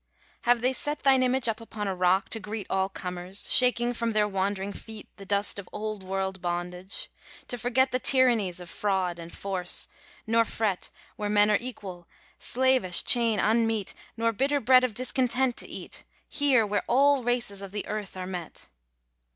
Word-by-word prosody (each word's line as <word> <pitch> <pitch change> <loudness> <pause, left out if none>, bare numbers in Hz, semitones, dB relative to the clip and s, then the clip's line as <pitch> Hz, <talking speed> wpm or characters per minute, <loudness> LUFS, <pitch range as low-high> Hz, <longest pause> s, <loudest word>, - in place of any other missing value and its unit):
Have 240 -1 +3
they 255 +2 +2
set 295 +3 -3
Thine 270 -1 +5
image 255 0 +2
up 225 0 -2
upon 215 -2 -5
a 195 - -1
rock 185 +1 +2
to 225 - -4
greet 210 0 -6
All 190 0 +1
comers, 180 0 -1
shaking 245 -1 +4
from 230 -1 -2
their 210 -1 +2
wandering 195 0 -2
feet 220 0 -10
The 195 -1 -11
dust 200 0 +1
of 190 - -10
old 215 -1 -5
world 190 0 -3
bondage, 180 +2 -5 0.4
to - - -2
forget 250 +2 +1
The 255 - 0
tyrannies 235 -10 +3
of 180 - -9
fraud 185 -2 -1
and 165 0 -9
force, 185 -3 -2 0.4
nor 230 0 +3
fret, 215 -4 -2 0.3
Where 210 -1 -3
men 210 0 +4
are 210 - +4
equal, 190 -8 -8 0.3
slavish 255 -8 +3
chain 230 -3 +3
unmeet, 225 -1 +1 0.2
Nor 230 0 +1
bitter 275 +6 0
bread 255 +1 +5
of 245 -5 -1
discontent 255 0 0
to - - 0
eat, - - -8 0.2
Here, 275 -6 +3
where 205 0 -1
all 280 +1 +4
races 240 -5 -1
of 195 -1 -8
the 205 0 -4
earth 210 -2 -5
are 185 - -4
met? 180 -2 -8
215 Hz, 175 wpm, -27 LUFS, 190-245 Hz, 0.4 s, Thine